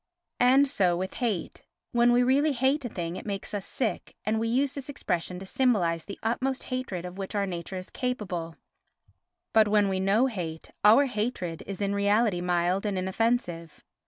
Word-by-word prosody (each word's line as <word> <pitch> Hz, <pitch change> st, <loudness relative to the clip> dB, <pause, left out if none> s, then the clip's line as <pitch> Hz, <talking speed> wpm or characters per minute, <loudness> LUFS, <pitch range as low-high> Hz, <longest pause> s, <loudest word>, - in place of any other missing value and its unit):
And 265 Hz, +3 st, +5 dB
so 185 Hz, -10 st, +2 dB
with 190 Hz, +1 st, -3 dB
hate. 220 Hz, -8 st, -2 dB, 0.3 s
When 240 Hz, 0 st, +4 dB
we 245 Hz, +1 st, +4 dB
really 280 Hz, +4 st, +3 dB
hate 270 Hz, +3 st, +1 dB
a 245 Hz, -, -3 dB
thing 175 Hz, -2 st, -4 dB
it -, -, -7 dB
makes 200 Hz, +1 st, -4 dB
us 205 Hz, -2 st, -3 dB
sick, 240 Hz, -5 st, -2 dB
and 220 Hz, +1 st, +1 dB
we 225 Hz, -, 0 dB
use 260 Hz, +4 st, +1 dB
this 280 Hz, -1 st, -6 dB
expression 180 Hz, -9 st, -2 dB
to 190 Hz, -, -8 dB
symbolise 190 Hz, -9 st, +1 dB
the 200 Hz, -, -7 dB
utmost 255 Hz, +4 st, -1 dB
hatred 250 Hz, -9 st, -4 dB
of 180 Hz, +2 st, -8 dB
which 195 Hz, +2 st, -5 dB
our 200 Hz, -1 st, +1 dB
nature 175 Hz, 0 st, -5 dB
is 185 Hz, -, -8 dB
capable; 190 Hz, -10 st, -3 dB, 1.0 s
but 220 Hz, -1 st, +6 dB
when 205 Hz, -1 st, +3 dB
we 190 Hz, -1 st, -1 dB
know 195 Hz, +5 st, +3 dB
we 265 Hz, -, +1 dB
hate, 165 Hz, -6 st, -6 dB
our 225 Hz, +7 st, +7 dB
hatred 210 Hz, -, -3 dB
is 200 Hz, 0 st, -5 dB
in 200 Hz, 0 st, 0 dB
reality 200 Hz, -1 st, +2 dB
mild 180 Hz, +2 st, +1 dB
and 205 Hz, -3 st, -1 dB
inoffensive. 185 Hz, -4 st, -1 dB
205 Hz, 190 wpm, -27 LUFS, 180-245 Hz, 1.0 s, our